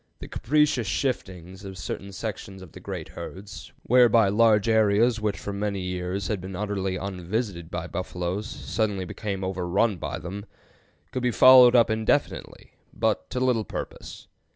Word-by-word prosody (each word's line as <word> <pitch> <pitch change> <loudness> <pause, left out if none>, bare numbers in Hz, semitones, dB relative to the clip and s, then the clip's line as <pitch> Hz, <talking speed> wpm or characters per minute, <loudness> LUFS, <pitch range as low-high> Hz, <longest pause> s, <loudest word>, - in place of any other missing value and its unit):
The - - -9
capricious 150 -4 +1
shiftings 95 -5 -3
of 95 -1 -8
certain 100 +3 -6
sections 95 -1 -6
of 85 - -13
the - - -11
great - - -6
herds, 100 +1 -9
whereby 115 -4 +5
large 105 0 +4
areas 110 +1 +3
which 105 -1 -1
for 100 - -6
many 100 0 -2
years 90 +1 -3
had 105 -4 -2
been 95 +1 -7
utterly 95 -1 -2
unvisited 95 -1 -4
by - - -4
buffaloes 90 +3 -4
suddenly 105 -4 -2
became 95 0 -5
overrun 95 +3 0
by - - -4
them, 100 +5 -7 0.6
could 130 - -3
be 125 - +1
followed 125 +1 +8
up 115 -2 +5
indefinitely, 110 0 -1 0.2
but 80 - -1
to 125 - -3
little 125 -3 +1
purpose. - - -8
100 Hz, 155 wpm, -25 LUFS, 95-115 Hz, 0.6 s, followed